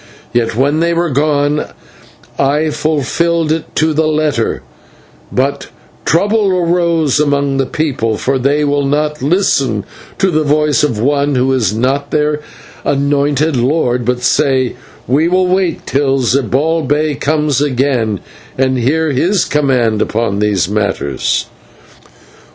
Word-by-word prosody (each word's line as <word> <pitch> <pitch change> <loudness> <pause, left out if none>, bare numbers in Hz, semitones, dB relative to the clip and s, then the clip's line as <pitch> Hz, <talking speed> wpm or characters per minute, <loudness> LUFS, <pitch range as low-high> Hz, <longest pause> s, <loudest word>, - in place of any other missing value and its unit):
Yet 115 -2 0
when 140 +5 +1
they 170 +1 +1
were 170 -1 0
gone 145 +1 +1 0.7
I 150 +3 +1
fulfilled 155 +2 0
it 160 0 -3
to 160 0 +2
the 155 +1 +1
letter; 150 -6 -1 0.7
but 135 +2 -1 0.4
trouble 205 +5 +2
arose 170 -5 +1
among 140 -2 +1
the 135 -1 0
people, 125 -8 -1
for 135 0 -1
they 140 +3 +1
will 145 -1 0
not 150 +1 -1
listen 135 - +1 0.3
to 190 -1 +1
the 155 -1 +1
voice 150 0 +2
of 140 -7 0
one 140 +4 +1
who 130 +1 +2
is 110 -6 0
not 135 +5 -1
their 150 0 0 0.4
anointed 145 +1 +1
lord, 125 -1 +1
but 125 +1 -1
say, 130 -3 +1 0.3
'We 145 +6 +2
will 185 +1 +2
wait 185 -2 0
until 135 -1 0
Zibalbay 145 +4 0
comes 150 -2 0
again 125 -7 0 0.4
and 130 -1 +1
hear 155 +6 +1
his 175 +8 +1
command 125 -7 +1
upon 110 -3 -1
these 105 -4 +1
matters.' 100 -9 -1
145 Hz, 130 wpm, -14 LUFS, 130-155 Hz, 0.7 s, to